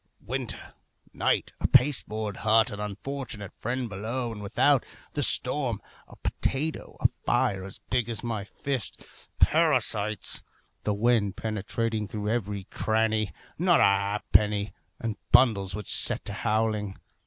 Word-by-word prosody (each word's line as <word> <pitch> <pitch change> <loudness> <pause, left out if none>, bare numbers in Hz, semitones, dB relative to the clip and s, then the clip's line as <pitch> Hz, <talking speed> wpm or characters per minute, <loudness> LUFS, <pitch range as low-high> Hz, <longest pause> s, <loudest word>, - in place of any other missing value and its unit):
Winter, - - -3 0.4
night, - - +1
a - - +3
pasteboard 110 -6 +3
hut, 110 +1 +4
an 100 - -6
unfortunate 105 0 -5
friend 125 +2 -2
below 115 +4 -3
and 105 -2 -7
without, 125 +6 +3 0.3
the 145 - -1
storm, 125 -4 +2 0.3
a - - -14
potato, 155 +4 -2
a - - +6 0.2
fire 95 -2 +1
as 95 0 -8
big 125 -2 +1
as 115 0 -4
my 115 -4 -2
fist, 130 +3 -4 0.3
parasites, 105 -1 +2 0.4
the 105 - +2
wind 105 -3 +2
penetrating 110 0 -2
through 105 +1 -3
every 105 -4 -1
cranny, 110 -1 +1 0.3
not 175 0 +5
a - - +6
halfpenny, 100 +1 +2 0.3
and 110 -3 -3
bundles 100 -7 +5
which 105 -3 -2
set - - +2
to 100 - -3
howling. 105 -2 0
110 Hz, 130 wpm, -28 LUFS, 105-120 Hz, 0.4 s, a